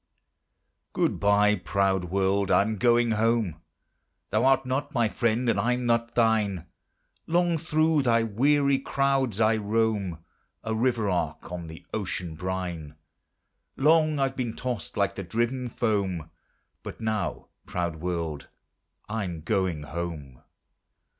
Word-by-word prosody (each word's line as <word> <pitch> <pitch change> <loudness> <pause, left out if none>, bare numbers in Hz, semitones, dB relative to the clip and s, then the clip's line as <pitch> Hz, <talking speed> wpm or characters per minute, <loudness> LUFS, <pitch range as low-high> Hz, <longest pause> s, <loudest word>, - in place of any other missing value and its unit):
Good - - 0
bye, 105 +1 +4
proud 95 0 0
world, 95 +1 +1
I'm 110 +2 +3
going 120 +1 +3
home: 110 -7 +1 0.7
Thou 110 +4 +2
art 135 0 +4
not 140 +3 -2
my 115 -3 +3
friend, 120 +2 0
and 110 -4 +2
I'm 125 +3 0
not 115 0 +1
thine. 110 -6 +2 0.6
Long 170 0 +2
through 155 -1 +2
thy 115 -3 +3
weary 140 +5 +2
crowds 135 -5 0
I 110 0 +4
roam; 105 -4 0 0.5
A 110 - -2
river 115 -1 +1
ark 90 -2 -2
on 85 -2 -5
the 80 0 -11
ocean 90 -5 -3
brine, 90 -3 -4 0.8
Long 155 +1 +4
I've 135 -1 0
been 120 -4 -3
tossed 125 -4 -4
like 100 -1 +1
the 100 - -6
driven 120 +6 -1
foam, 95 -9 -1 0.5
But - - -8
now, 110 -4 -2 0.2
proud 85 -3 -2
world, 85 -3 -3 0.6
I'm 95 -7 -3
going 90 -4 -1
home. 75 -5 -6
110 Hz, 125 wpm, -27 LUFS, 90-125 Hz, 0.8 s, bye